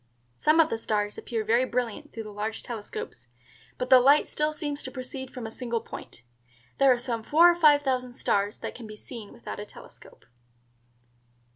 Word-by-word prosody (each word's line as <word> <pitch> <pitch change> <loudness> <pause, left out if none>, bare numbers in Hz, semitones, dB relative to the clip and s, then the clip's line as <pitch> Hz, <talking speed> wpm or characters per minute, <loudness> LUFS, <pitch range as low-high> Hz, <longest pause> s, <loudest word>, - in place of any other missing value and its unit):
Some 305 - +3
of 320 -1 +5
the 225 - -1
stars 210 -2 -1
appear 225 -2 -3
very 230 +4 +3
brilliant 250 +3 -3
through 225 - -6
the 215 - -9
large 210 +2 -4
telescopes, 205 - -7 0.5
but 250 +1 -4
the 260 - +10
light 280 +4 +5
still 300 0 -1
seems 295 -2 -4
to - - -6
proceed 260 +1 -7
from 250 -3 -7
a 220 - -6
single 235 -1 -2
point. 120 - -9 0.6
There 275 -1 +6
are 250 - +4
some 240 -2 -3
four 330 +9 +6
or - - -1
five 300 -4 +5
thousand 255 -2 -1
stars 205 -3 0
that - - -4
can 235 -3 -9
be 215 - -9
seen 220 -1 -10
without 235 - -8
a 205 - -5
telescope." - - -15
245 Hz, 190 wpm, -27 LUFS, 220-275 Hz, 0.6 s, the